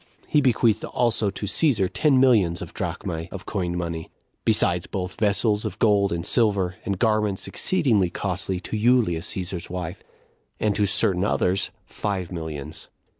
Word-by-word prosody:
He 150 - +3
bequeathed 115 -4 +2
also 115 -3 0
to 100 +1 -5
Cæsar 105 - +2
ten 145 -4 +3
millions 105 -10 +4
[of - - -9
drachmae] 80 +1 -4
of 95 -2 -7
coined 90 -4 -2
money, 85 -2 -4 0.3
besides 90 -6 +2
both 90 -2 -5
vessels 105 0 +1
of 110 -5 -4
gold 100 -3 +3
and 85 0 -2
silver, 100 -6 +1
and 100 -1 -2
garments 105 -2 +1
exceeding 135 - +1
costly, 95 0 -2
to - - -5
Julia, 110 -6 +3
Cæsar's 90 -1 -4
wife; 90 0 -5 0.6
and 105 -2 +1
to 105 -1 +2
certain 95 -1 +3
others, 95 -1 +1 0.2
five 95 -4 -3
millions. 80 -3 -6
100 Hz, 150 wpm, -24 LUFS, 90-110 Hz, 0.6 s, millions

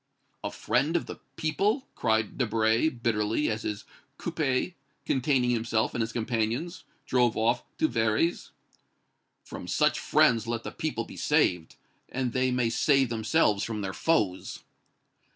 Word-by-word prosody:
"A - - -2
friend 160 +4 0
of 170 - +1
the - - -8 0.2
people!" 205 - 0
cried 110 -1 0
Debray, 115 +3 +2
bitterly, 115 0 0
as 110 0 -3
his 105 -1 -4 0.3
coupé, 155 -1 -1 0.3
containing 130 -2 +2
himself 115 -1 0
and 115 -1 -1
companions, 120 +9 -2 0.2
drove 125 -3 +2
off 120 +2 +2 0.2
to 155 - +3
Véry's. 115 +8 0 0.9
"From - - -8
such - - +2
friends 115 -1 +3
let 115 -1 -2
the - - -5
people - - -3
be - - -11
saved, 90 -3 +1 0.3
and 125 -2 -2
they 130 0 +2
may 125 -2 +1
save 135 +1 +3
themselves 110 -2 +2
from 110 -2 -3
their 95 -2 -3
foes." 105 - 0
120 Hz, 135 wpm, -28 LUFS, 110-135 Hz, 0.9 s, to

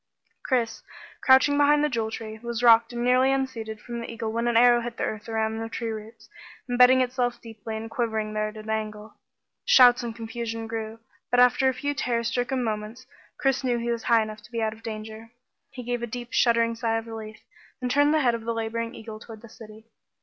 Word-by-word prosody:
Chris, 240 -4 -1 0.4
crouching 265 +2 +5
behind 295 +1 +4
the - - +3
Jewel 230 -6 -2
Tree, 220 0 -7
was 235 +1 -4
rocked 230 0 +6
and 240 0 -3
nearly 255 +2 +4
unseated 240 -5 -3
from 235 +2 -7
the - - -7
eagle 225 -1 -4
when 230 +1 -1
an 235 -1 +2
arrow 240 0 +6
hit 235 0 -6
the - - -2
earth 215 +1 -4
around 220 0 -1
the 225 0 -5
Tree 230 0 -4
roots, 220 0 -9 0.4
imbedding 250 +1 +5
itself 245 -1 -1
deeply 225 -1 -7
and 220 +1 -6
quivering 220 -2 -2
there 215 0 -1
at 215 +1 -9
an 215 0 -10
angle. 215 0 -4
The - - -30 0.6
shouts 250 -1 +7
and 235 -2 -5
confusion 225 0 -5
grew, 225 0 -5 0.3
but 245 - +2
after 250 +2 +5
a - - -1
few 285 +2 -2
terror 235 -4 -1
stricken 245 +2 -1
moments 220 +3 -4 0.3
Chris 270 0 0
knew 245 -2 +1
he 235 0 -2
was 235 -1 -2
high 230 -2 +4
enough 215 0 -8
to 210 - -18
be 230 - -3
out 220 0 -1
of 220 - -16
danger. 220 0 -8 0.4
He 255 -3 -9
gave 245 0 -3
a 240 - -3
deep 240 +1 -7
shuddering 230 -1 +3
sigh 225 0 -1
of 225 - -5
relief, 220 -1 -8 0.4
and 250 -1 -2
turned 290 +2 +4
the 310 0 +3
head 245 -3 +3
of 230 -1 -4
the 230 0 -2
laboring 230 +1 -3
eagle 220 -1 -9
toward 220 -1 -12
the 230 - -12
city. 215 0 -13
230 Hz, 225 wpm, -25 LUFS, 220-245 Hz, 0.6 s, shouts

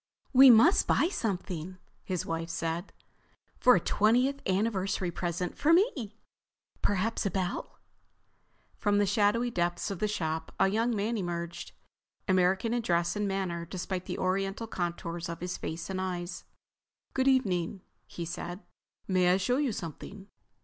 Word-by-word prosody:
"We 265 +1 +9
must 245 - +6
buy 340 - +3
something," 185 - -3 0.3
his 185 -3 -3
wife 165 0 -3
said. 165 +2 -3 0.7
"For 250 - +6
a - - +3
twentieth 250 +10 +2
anniversary 190 -2 0
present 175 +1 -3
for 310 +3 +4
me. 275 - +1 0.6
Perhaps 205 +2 0
a - - +1
bell?" 185 -1 -3 1.0
From 205 -1 +2
the 205 - +4
shadowy 210 +4 +2
depths 175 +1 -1
of 195 - -5
the 215 - +1
shop 160 -5 -3
a 195 - +5
young 225 +3 +1
man 215 +3 -1
emerged, 170 -2 -5 0.5
American 185 +4 +2
in 240 - +1
dress 170 -3 +1
and 210 0 -1
manner 190 -3 -2
despite 185 +1 -5
the - - -3
Oriental 195 +4 -1
contours 170 -3 -4
of 170 - -5
his 180 0 -4
face 165 +1 -5
and 190 -1 -3
eyes. 180 -1 -4 0.7
"Good 265 0 +1
evening," 195 -8 +1 0.3
he 170 - -6
said. 175 +3 -6 0.5
"May 185 -2 +3
I 185 - +4
show 220 +7 +1
you 285 -4 +1
something?" 195 +3 -8
190 Hz, 150 wpm, -29 LUFS, 175-220 Hz, 1.0 s, We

